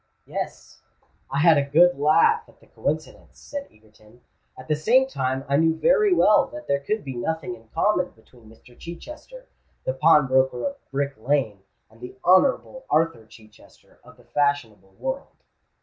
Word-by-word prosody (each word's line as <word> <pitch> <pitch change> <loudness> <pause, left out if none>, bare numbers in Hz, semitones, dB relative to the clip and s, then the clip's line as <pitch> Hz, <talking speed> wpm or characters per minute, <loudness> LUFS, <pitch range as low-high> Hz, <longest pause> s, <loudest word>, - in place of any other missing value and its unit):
"Yes: - - -7 0.5
I - - -3
had 160 -3 +6
a - - +1
good 175 +4 +5
laugh 165 - +3
at - - -23
the - - -22
coincidence," - - -5
said 285 -1 -7
Egerton. 110 +2 -23 0.4
"At 130 - -12
the 150 - +1
same 240 - +3
time 135 - -3
I 140 0 +2
knew 160 +1 +2
very 445 - +3
well 215 -12 +4
that 305 0 -10
there 140 - +1
could 210 +10 -3
be 135 - -6
nothing 150 +1 -3
in 115 -1 -20
common 180 - 0
between 110 0 -20
Mr. 115 +2 -19
Chichester, 305 - -11 0.4
the 130 - -2
pawnbroker 130 -3 +3
of 280 0 -6
Brick 140 0 -2
Lane, 115 -5 -1 0.3
and 110 +2 -23
the 125 - -9
Honourable 260 +7 +3
Arthur 155 -8 0
Chichester 110 -1 -20
of - - -17
the - - -20
fashionable 115 -10 -2
world." 265 +1 -6
145 Hz, 165 wpm, -24 LUFS, 125-200 Hz, 0.5 s, had